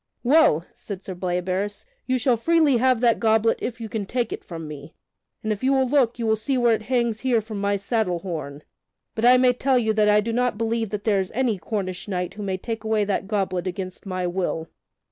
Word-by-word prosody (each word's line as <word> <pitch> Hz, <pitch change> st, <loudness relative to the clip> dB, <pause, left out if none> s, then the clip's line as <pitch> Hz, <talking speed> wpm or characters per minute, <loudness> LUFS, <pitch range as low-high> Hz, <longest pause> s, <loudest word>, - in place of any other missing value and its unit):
"Well," 250 Hz, -, +4 dB
said 195 Hz, -2 st, -8 dB
Sir 190 Hz, -, -5 dB
Bleoberis, 185 Hz, +3 st, -2 dB, 0.2 s
"you 255 Hz, 0 st, +2 dB
shall 250 Hz, 0 st, +2 dB
freely 305 Hz, +2 st, +3 dB
have 255 Hz, -1 st, +2 dB
that 235 Hz, -2 st, +3 dB
goblet 225 Hz, 0 st, +2 dB
if 235 Hz, -1 st, -4 dB
you 225 Hz, -, -5 dB
can 215 Hz, -2 st, -4 dB
take 240 Hz, -1 st, -1 dB
it -, -, -7 dB
from 165 Hz, -3 st, -7 dB
me, 150 Hz, 0 st, -10 dB, 0.5 s
and 215 Hz, -, -1 dB
if 210 Hz, +1 st, -3 dB
you 270 Hz, +1 st, +3 dB
will 265 Hz, -1 st, +2 dB
look, 250 Hz, -4 st, +2 dB
you 235 Hz, -, -3 dB
will 220 Hz, 0 st, +3 dB
see 255 Hz, +5 st, -1 dB
where 240 Hz, -2 st, +4 dB
it 220 Hz, -, -1 dB
hangs 235 Hz, -1 st, 0 dB
here 250 Hz, -2 st, +2 dB
from 215 Hz, -2 st, -6 dB
my 200 Hz, 0 st, +1 dB
saddle 200 Hz, -3 st, 0 dB
horn. 155 Hz, -5 st, -6 dB, 0.5 s
But 225 Hz, -, -1 dB
I 250 Hz, +1 st, +7 dB
may 250 Hz, 0 st, +4 dB
tell 260 Hz, +1 st, +1 dB
you 220 Hz, -3 st, +1 dB
that 215 Hz, -1 st, +3 dB
I 210 Hz, 0 st, +5 dB
do 225 Hz, +2 st, -2 dB
not 245 Hz, -2 st, +1 dB
believe 225 Hz, -1 st, -1 dB
that 205 Hz, 0 st, -4 dB
there 205 Hz, -3 st, +2 dB
is 190 Hz, -1 st, -3 dB
any 240 Hz, -6 st, +1 dB
Cornish 185 Hz, -2 st, -4 dB
knight 180 Hz, -3 st, -3 dB
who 210 Hz, -, -8 dB
may 190 Hz, -2 st, -2 dB
take 225 Hz, +3 st, -5 dB
away 220 Hz, -1 st, +1 dB
that 200 Hz, -1 st, -1 dB
goblet 190 Hz, -3 st, -1 dB
against 185 Hz, +1 st, -6 dB
my 185 Hz, -1 st, -2 dB
will." 175 Hz, -2 st, -2 dB
215 Hz, 230 wpm, -24 LUFS, 190-240 Hz, 0.5 s, I